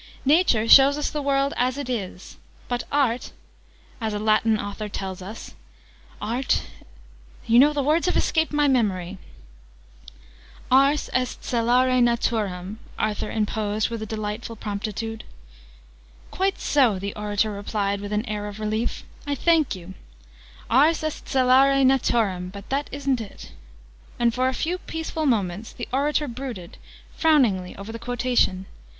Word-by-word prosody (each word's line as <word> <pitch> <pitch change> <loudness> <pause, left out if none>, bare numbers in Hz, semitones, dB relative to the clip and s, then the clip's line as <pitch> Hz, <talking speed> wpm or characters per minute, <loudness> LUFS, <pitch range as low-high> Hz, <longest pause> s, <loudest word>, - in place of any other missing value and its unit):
Nature 280 -7 +3
shows 275 +3 +8
us 295 - -2
the 300 - -3
world 275 0 +1
as 255 +2 +1
it 285 -3 -4
is. 195 -7 -5 0.3
But 245 -1 -2
Art 260 -4 0 0.7
as 220 -2 -2
a - - -1
Latin 215 +1 +2
author 205 +1 -5
tells 190 -2 -5
us 205 +5 -9 0.7
Art, 240 +5 0 0.8
you 230 +1 +5
know 290 +3 +6
the 290 -2 -1
words 315 +5 +2
have 365 - +1
escaped 320 -1 +1
my 295 -1 +2
memory 195 -8 0 0.8
" - - -21
"Ars 275 +3 +4
est 255 -1 -1
celare 250 +2 +3
Naturam," 215 -5 0 0.2
Arthur 210 -1 -2
interposed 215 0 -1
with 230 -1 -4
a 220 - -5
delightful 215 +2 -4
promptitude. 215 +1 -5 1.1
"Quite 385 +1 0
so!" 255 -9 +3
the 200 +2 -4
orator 210 0 -1
replied 200 0 -2
with 205 0 -6
an 210 +2 -1
air 210 -2 -4
of 205 +1 -8
relief. 215 +2 -2 0.2
"I 285 - 0
thank 320 -5 +2
you! 185 +1 -10 0.7
Ars 300 +7 +3
est 310 -1 -4
celare 270 +1 +4
Naturam 225 -8 +1
but 200 0 -10
that 280 +2 -1
isn't 275 -3 -1
it." 210 - -10 0.7
And, 235 -1 +2
for 255 +1 +1
a - - -3
few 350 +6 -2
peaceful 320 -2 -3
moments, 205 -3 -1
the 240 - -7
orator 295 +2 +1
brooded, 235 -8 -7 0.4
frowningly, 240 - +2
over 200 +3 -8
the 230 - -7
quotation. 245 -6 0
230 Hz, 145 wpm, -24 LUFS, 205-275 Hz, 1.1 s, shows